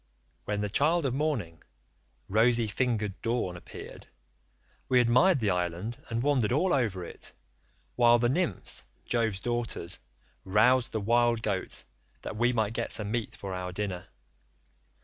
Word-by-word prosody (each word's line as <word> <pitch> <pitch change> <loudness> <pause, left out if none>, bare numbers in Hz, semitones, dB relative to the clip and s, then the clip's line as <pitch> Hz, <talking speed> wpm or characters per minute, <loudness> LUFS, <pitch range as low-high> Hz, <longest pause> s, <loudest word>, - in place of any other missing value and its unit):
"When 105 0 -1
the 105 - 0
child 155 +6 +2
of 130 - 0
morning, 130 - -2 0.7
rosy 115 +3 +3
fingered 110 -3 -1
Dawn 115 -6 -1
appeared, 85 - -10 0.8
we 125 - +5
admired 125 +9 +4
the 105 -4 +1
island 90 +6 -3
and 115 +1 -1
wandered 135 -7 +2
all 175 +8 +2
over 105 -9 0
it, - - -9 0.6
while 120 -1 +6
the 120 0 +2
nymphs 135 - -1 0.2
Jove's 110 -5 0
daughters 115 -6 -3 0.4
roused 115 +6 +3
the 110 - -1
wild 120 +1 +2
goats 100 -4 -2 0.4
that - - -5
we 120 +3 +2
might 110 -3 0
get 115 0 -1
some 105 -1 +2
meat 115 -1 -2
for 95 -1 -6
our 90 0 -4
dinner. 95 -2 -4
115 Hz, 145 wpm, -29 LUFS, 100-125 Hz, 0.8 s, while